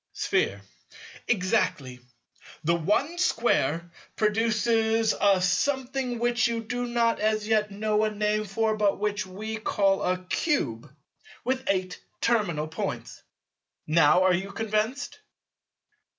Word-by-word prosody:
Sphere. - - 0 0.7
Exactly. 185 - 0 0.6
The 170 +2 +2
one 210 - 0
Square 170 - +1 0.2
produces 225 +1 +2
a 200 -2 +3
Something 260 +4 0
which 240 +1 +2
you 230 -1 -3
do 245 +2 -3
not 235 -1 +1
as 215 0 0
yet 215 -1 +2
know 210 +1 0
a 215 - +2
name 210 0 -1
for 220 +2 0
but 210 -2 +1
which 205 -1 -2
we 215 +4 -5
call 195 -2 +1
a 180 0 0
cube 150 - -1 0.5
with 260 +1 -1
eight 185 -2 -1 0.2
terminal 185 -10 0
Points. 160 - -5 0.6
Now 155 +3 +4
are 185 -1 +4
you 190 +3 -2
convinced? 220 +5 -2
215 Hz, 120 wpm, -26 LUFS, 185-230 Hz, 0.7 s, Now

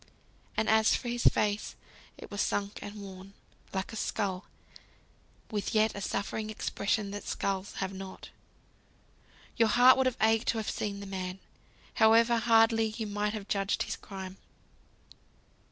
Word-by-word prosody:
And 220 - +1
as 220 0 +5
for 245 - -4
his 240 0 -2
face, 210 0 +2 0.4
it - - -11
was 205 - -1
sunk 200 0 -1
and 205 - -7
worn, 195 -1 -10 0.4
like 190 +3 -3
a - - -5
skull, 195 -3 -2 1.1
with 210 0 -2
yet 215 0 +3
a 200 - -6
suffering 215 +2 -3
expression 200 -1 -1
that 205 0 -6
skulls 195 0 -2
have 190 0 -3
not! 190 0 -9 1.3
Your 230 -2 +4
heart 245 +4 +7
would 265 -1 +3
have 255 - -1
ached 225 +1 +3
to 230 - +1
have 220 - -2
seen 200 -1 -3
the - - -7
man, 185 -1 -4 0.6
however 230 +1 +6
hardly 225 0 +4
you 225 - -2
might 210 0 -1
have 210 -2 -6
judged 200 -1 0
his - - -4
crime. 190 -1 -8
205 Hz, 155 wpm, -30 LUFS, 195-225 Hz, 1.3 s, heart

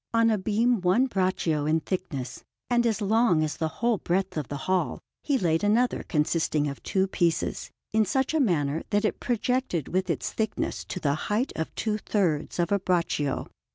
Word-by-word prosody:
On 230 0 +4
a 215 - +2
beam 220 +3 +1
one 185 +9 +3
braccio 185 - 0
in 160 +1 +2
thickness, 160 -10 -4 0.3
and 240 0 +3
as 220 -1 0
long 210 -5 +3
as 155 0 -2
the 160 - 0
whole 225 +6 0
breadth 185 +2 -1
of 150 -5 -3
the 145 - -4
hall, 185 -1 0 0.2
he 285 -3 +1
laid 165 -6 +1
another 230 +4 +2
consisting 150 -1 0
of 140 -1 -6
two 190 -1 +1
pieces, 175 -3 -1 0.2
in 220 0 +4
such 265 +5 0
a 320 - +2
manner 160 - +1
that 205 +1 +1
it - - -1
projected 240 - -1
with 185 +1 -1
its - - -2
thickness 220 -1 -2
to 185 - -5
the 145 -4 +1 0.2
height 220 +6 0
of 160 - -3
two 215 -1 -1
thirds 175 -9 0
of 175 +1 0
a 200 - +3
braccio. 170 -6 0
185 Hz, 190 wpm, -27 LUFS, 160-220 Hz, 0.3 s, On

